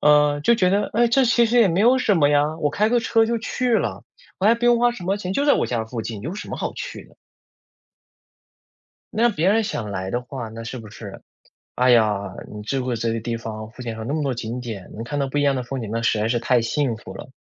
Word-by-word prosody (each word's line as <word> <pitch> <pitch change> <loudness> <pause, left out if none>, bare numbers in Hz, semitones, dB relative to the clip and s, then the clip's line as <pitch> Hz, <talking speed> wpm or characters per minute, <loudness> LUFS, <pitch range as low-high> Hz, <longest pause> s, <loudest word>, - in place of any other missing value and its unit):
嗯， 150 -1 +4
就 235 - +4
觉 185 -5 +2
得： 200 +2 +1
“哎， 240 +2 +3
这 265 +3 +4
其 235 0 +4
实 240 +2 +2
也 220 - +5
没 175 +2 +1
有 245 +4 +5
什 220 -5 +2
么 145 -3 +4
呀， 145 +2 +2
我 150 -2 +1
开 210 +8 +1
个 240 +1 +3
车 225 0 +3
就 235 +1 0
去 245 +2 -1
了， - - -1 0.3
我 190 - -2
还 225 - +6
不 235 +1 -4
用 240 -1 +5
花 240 0 +4
什 200 -7 -9
么 195 +3 0
钱， 185 -3 -4
就 280 +8 0
在 290 - +6
我 - - 0
家 115 -2 -2
附 115 0 -5
近， 110 -2 -6
有 155 - -5
什 210 - -7
么 - - -4
好 - - -3
去 - - -7
的。” - - -23 2.0
那 235 +2 +4
别 180 -4 +1
人 220 +3 +3
想 110 - -4
来 95 -1 -4
的 120 - -1
话， 125 -2 -6
那 115 +1 -8
是 120 - -6
不 110 -3 -9
是， 105 -4 -10 0.5
“哎 125 +1 +2
呀， 105 -5 +3 0.2
你 105 - -7
住 130 +5 -2
过 125 -2 -1
这 115 0 -1
个 115 - -2
地 115 +1 -3
方， 110 -1 -7
附 125 - -12
近 120 -2 -4
还 - - -10
有 - - -5
那 140 - -2
么 155 - -1
多 135 -3 -1
景 120 +1 -5
点， 110 -6 -7
能 110 - -6
看 145 +5 -4
到 140 -1 0
不 145 +2 -1
一 - - +2
样 140 -1 +2
的 130 - -2
风 130 +1 -5
景， 110 - -6
那 115 - -1
实 110 - +2
在 105 - +1
是 120 +1 +1
太 120 0 +2
幸 120 +1 0
福 110 - -11
了。” - - -9
135 Hz, 300 characters per minute, -22 LUFS, -, 2.0 s, 还